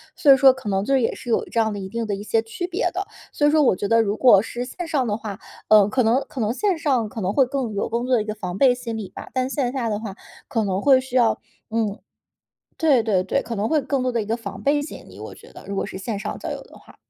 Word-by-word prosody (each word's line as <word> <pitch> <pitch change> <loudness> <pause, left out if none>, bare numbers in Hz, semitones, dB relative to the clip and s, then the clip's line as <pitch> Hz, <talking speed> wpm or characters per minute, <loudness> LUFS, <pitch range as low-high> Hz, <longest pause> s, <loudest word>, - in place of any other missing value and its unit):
所 285 - +5
以 270 - +8
说 265 0 +7
可 260 -5 -7
能 195 0 0
就 275 - 0
是 265 - +4
也 230 - 0
是 245 - -9
有 230 - +2
这 230 - -2
样 220 -1 +1
的 205 - -5
一 190 -1 -6
定 230 +2 -3
的 205 -2 -2
一 200 - -7
些 225 +1 +1
区 230 +11 -5
别 365 +6 -1
的。 385 +2 -3 0.2
所 295 - +2
以 - - +4
说 305 -1 +4
我 250 - +4
觉 200 - -3
得 230 +2 +4
如 205 -2 0
果 225 -6 +6
是 240 +3 -5
线 345 +7 -6
上 280 -6 0
的 210 -1 -1
话， 215 -2 -7 0.3
呃， 210 -2 +7
可 255 +4 +1
能 235 +4 +3
可 260 - -6
能 215 +1 0
线 390 +4 0
上 265 -8 +1
可 220 - -6
能 190 +1 -1
会 270 - +4
更 250 -4 -3
有 200 - -1
工 235 +2 -1
作 255 - 0
的 225 - +2
一 - - -5
个 215 0 -4
防 185 -4 -5
备 255 +2 +5
心 235 -2 -5
理 205 -4 -6
吧。 - - -10
但 255 0 0
线 265 -3 -1
下 255 -3 -2
的 210 - -1
话 210 -4 -7 0.3
可 225 -5 0
能 190 0 -1
会 270 0 +6
需 260 -1 -8
要， 240 -3 +3 0.3
嗯 220 -3 -1 0.8
对 290 -7 +3
对 205 -5 +1
对， 195 +9 -1
可 230 - -5
能 210 +1 -1
会 315 -1 +2
更 275 -1 -1
多 255 - 0
的 235 - 0
一 - - -7
个 225 +2 -1
防 200 -4 -8
备 290 +4 +2
心 290 - -9
理， - - -14
我 - - -8
觉 - - -16
得， - - -13
如 200 - -5
果 - - -1
是 205 - -8
线 200 +2 -4
上 - - -4
交 - - -5
友 - - -4
的 - - -17
话。 - - -19
230 Hz, 330 characters per minute, -22 LUFS, 210-265 Hz, 0.8 s, 以